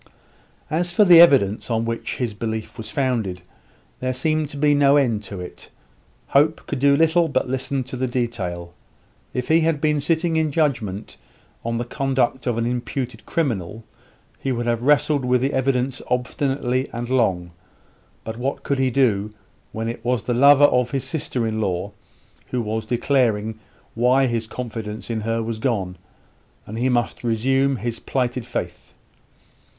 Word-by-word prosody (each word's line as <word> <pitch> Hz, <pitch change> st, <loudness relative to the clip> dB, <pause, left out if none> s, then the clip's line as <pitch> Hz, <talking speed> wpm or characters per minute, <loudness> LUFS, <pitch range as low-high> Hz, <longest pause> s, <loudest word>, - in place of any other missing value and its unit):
As 175 Hz, +3 st, +1 dB
for 205 Hz, +4 st, +4 dB
the 175 Hz, -3 st, +9 dB
evidence 125 Hz, -, +4 dB
on 115 Hz, -1 st, 0 dB
which 115 Hz, 0 st, -3 dB
his 120 Hz, -4 st, -2 dB
belief 110 Hz, 0 st, -4 dB
was 110 Hz, -, -7 dB
founded, 115 Hz, -, -1 dB, 0.6 s
there 130 Hz, 0 st, -2 dB
seemed 155 Hz, +2 st, 0 dB
to 145 Hz, -, -8 dB
be 145 Hz, +1 st, +3 dB
no 145 Hz, 0 st, +5 dB
end 120 Hz, -7 st, +1 dB
to 100 Hz, -3 st, -7 dB
it. 90 Hz, -, -9 dB, 0.6 s
Hope 150 Hz, +3 st, +2 dB
could 140 Hz, -, -4 dB
do 140 Hz, +1 st, +4 dB
little 165 Hz, +2 st, +3 dB
but 145 Hz, -, 0 dB
listen 130 Hz, +1 st, -1 dB
to 130 Hz, +1 st, -7 dB
the 130 Hz, +1 st, -1 dB
detail. 95 Hz, -9 st, -3 dB, 0.6 s
If 125 Hz, -1 st, -3 dB
he 160 Hz, +1 st, +4 dB
had 160 Hz, -2 st, +1 dB
been 150 Hz, -1 st, +1 dB
sitting 165 Hz, +2 st, +1 dB
in 155 Hz, -2 st, +1 dB
judgment 115 Hz, -, -1 dB, 0.5 s
on 115 Hz, 0 st, -2 dB
the 120 Hz, -, -2 dB
conduct 130 Hz, 0 st, -1 dB
of 120 Hz, -2 st, 0 dB
an 115 Hz, -, 0 dB
imputed 125 Hz, +1 st, -4 dB
criminal, 115 Hz, -, -2 dB, 0.6 s
he 135 Hz, -, -2 dB
would 120 Hz, -1 st, -2 dB
have 120 Hz, -1 st, 0 dB
wrestled 145 Hz, +1 st, +3 dB
with 125 Hz, 0 st, +2 dB
the 135 Hz, +2 st, 0 dB
evidence 130 Hz, 0 st, 0 dB
obstinately 130 Hz, +1 st, -1 dB
and 120 Hz, +1 st, -4 dB
long; 95 Hz, -9 st, +1 dB, 0.7 s
but 110 Hz, 0 st, -6 dB
what 130 Hz, +3 st, -3 dB
could 140 Hz, -1 st, -1 dB
he 130 Hz, -1 st, +2 dB
do, 110 Hz, -6 st, +1 dB, 0.4 s
when 110 Hz, +1 st, -4 dB
it 115 Hz, -, -5 dB
was 125 Hz, -3 st, 0 dB
the 120 Hz, -, -1 dB
lover 140 Hz, +3 st, +6 dB
of 125 Hz, -3 st, +2 dB
his 135 Hz, +1 st, -2 dB
sister 130 Hz, -6 st, -2 dB
in 110 Hz, 0 st, -2 dB
law 95 Hz, 0 st, -2 dB, 0.6 s
who 125 Hz, -, -2 dB
was 110 Hz, -1 st, -3 dB
declaring 115 Hz, -3 st, +1 dB, 0.3 s
why 125 Hz, +3 st, +3 dB
his 115 Hz, -3 st, -1 dB
confidence 110 Hz, -2 st, -6 dB
in 110 Hz, -1 st, -2 dB
her 115 Hz, +1 st, -1 dB
was 110 Hz, -1 st, -4 dB
gone, 100 Hz, -7 st, -1 dB, 0.7 s
and 110 Hz, +2 st, -6 dB
he 130 Hz, +2 st, +1 dB
must 120 Hz, -1 st, -1 dB
resume 135 Hz, +4 st, +1 dB
his 120 Hz, -1 st, -4 dB
plighted 125 Hz, -2 st, -2 dB
faith? 125 Hz, -, -6 dB
125 Hz, 165 wpm, -22 LUFS, 115-140 Hz, 0.7 s, the